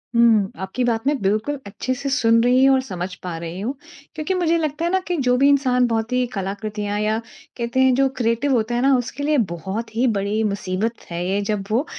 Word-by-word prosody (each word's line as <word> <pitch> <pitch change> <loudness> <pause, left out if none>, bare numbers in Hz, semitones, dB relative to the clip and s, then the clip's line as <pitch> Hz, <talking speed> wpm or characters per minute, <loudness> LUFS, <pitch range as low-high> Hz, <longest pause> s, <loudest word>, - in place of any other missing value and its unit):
हुँ, 225 -4 +4
आपकी 190 +7 -3
बात 230 -1 0
मैं 295 - +3
बिल्कुल 215 +9 0
अच्छे 205 +5 -3
से 275 +2 -4
सुन 230 -4 +3
रही 250 +2 +4
हूँ 270 0 +6
और 260 - +2
समझ 185 -5 -5
पा 175 -2 -4
रही 170 +2 -6
हूँ, 230 +7 -2 0.4
क्योंकि 310 +5 -2
मुझे 340 -2 +2
लगता 310 0 -2
है 345 - 0
ना 380 - +3
कि 355 - 0
जो 250 - +4
भी 275 +2 +5
इंसान 255 -3 +3
बहुत 225 0 -1
ही 250 0 +2
कलाकृतियाँ 205 +1 -3
या 215 +1 +1 0.4
कहते 235 +1 -1
हैं, 260 0 +5
जो 270 +1 +3
क्रिएटिव 235 +4 +1
होता 235 +1 0
है 240 - +1
ना, 270 +1 +4
उसके 250 +3 -4
लिए 300 +1 +2
बहुत 200 +7 -5
ही 245 +3 +2
बड़ी 205 +3 0
मुसीबत 205 +2 -2
है 170 +1 -3
ये, 195 +2 0
जब 205 -1 -2
वो 250 +8 +2
230 Hz, 225 wpm, -21 LUFS, 205-265 Hz, 0.4 s, हूँ